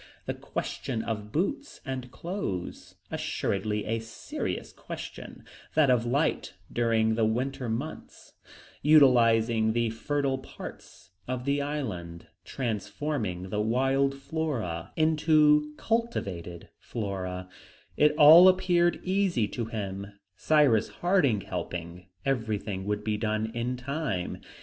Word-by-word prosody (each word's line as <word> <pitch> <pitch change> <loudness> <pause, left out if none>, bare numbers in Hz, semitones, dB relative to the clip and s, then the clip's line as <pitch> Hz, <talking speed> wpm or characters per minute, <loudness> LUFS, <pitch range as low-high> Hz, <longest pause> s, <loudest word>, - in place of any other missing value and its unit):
The - - -2
question 110 - -4
of 105 -2 -4
boots 280 - -2
and 130 -1 -4
clothes 165 - -5 0.2
assuredly 105 +1 -2
a 115 +1 -1
serious 110 0 -5
question, - - -9 0.3
that 150 -4 +5
of 120 -1 +2
light 140 -5 0 0.2
during 115 -2 +2
the 115 0 +1
winter 125 +3 -1
months, 130 +8 -6 0.5
utilizing 115 -6 +5
the 115 -1 +1
fertile 135 +3 -1
parts 130 - -11 0.2
of 125 0 -3
the 140 0 +1
island, 105 - -4 0.2
transforming 105 -4 -3
the 105 - 0
wild 135 +5 +2
flora 135 - -3
into 155 -1 +4
cultivated 100 - -2
flora, 95 -4 -4 0.5
it 150 0 +4
all 160 +5 +10
appeared 180 -2 +3
easy 185 - +1
to 120 - -3
him; 100 -3 -5 0.3
Cyrus 135 -3 +3
Harding 165 - +2
helping, 90 -2 -6 0.2
everything 110 -7 -2
would 105 0 -2
be 105 -1 -1
done 110 0 -1
in 120 +2 -2
time. 135 - -3
120 Hz, 110 wpm, -28 LUFS, 105-150 Hz, 0.5 s, all